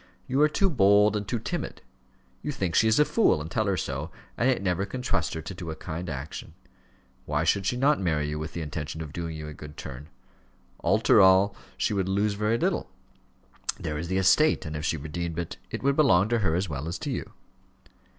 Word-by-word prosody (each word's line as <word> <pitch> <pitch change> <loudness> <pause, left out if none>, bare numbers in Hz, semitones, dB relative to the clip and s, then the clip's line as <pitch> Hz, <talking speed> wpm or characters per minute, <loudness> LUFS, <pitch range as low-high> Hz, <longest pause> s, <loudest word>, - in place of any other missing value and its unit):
You 135 +3 +1
are 150 - +6
too 195 +6 +2
bold, 105 -4 +5
and 105 -1 -2
too 120 - -1
timid: - - -5 0.6
you 150 - -3
think 95 - -2
she 110 - +4
is 110 - +4
a 150 - +6
fool 225 - +3
and 80 +2 -7
tell 110 +2 0
her 95 -2 +1
so, 70 +1 -3 0.3
and 125 - +2
yet 130 - +2
never 90 0 +1
can 125 +6 -5
trust 95 -10 0
her 80 - -5
to 95 - -6
do 85 -2 -7
a 80 - -4
kind 85 +2 -5
action. 70 +1 -6 0.7
Why 75 +1 0
should 95 +4 +1
she 125 - 0
not 145 +3 +3
marry 80 -5 0
you 75 0 -3
with 80 +1 -5
the 85 - -4
intention 75 +1 -5
of 75 -1 -9
doing 85 -2 -4
you 75 0 -6
a 75 - -7
good 75 0 -11
turn? 70 +4 -8 0.7
After - - +5
all, 95 +1 +5 0.2
she - - 0
would 95 -2 0
lose 100 +2 +1
very 105 +3 +1
little: - - -1 0.9
there 75 -1 -3
is 85 - -4
the 95 +2 0
estate, 95 +12 +4
and 75 0 -5
if 75 - -4
she 80 - 0
redeemed 80 +3 -4
it, 85 -1 -4
it - - -5
would 140 0 +3
belong 105 - +4
to 120 -1 +2
her 85 -6 +1
as 95 +2 0
well 75 -1 -4
as 85 +1 -3
to - - -4
you." - - -5
90 Hz, 230 wpm, -27 LUFS, 80-105 Hz, 0.9 s, are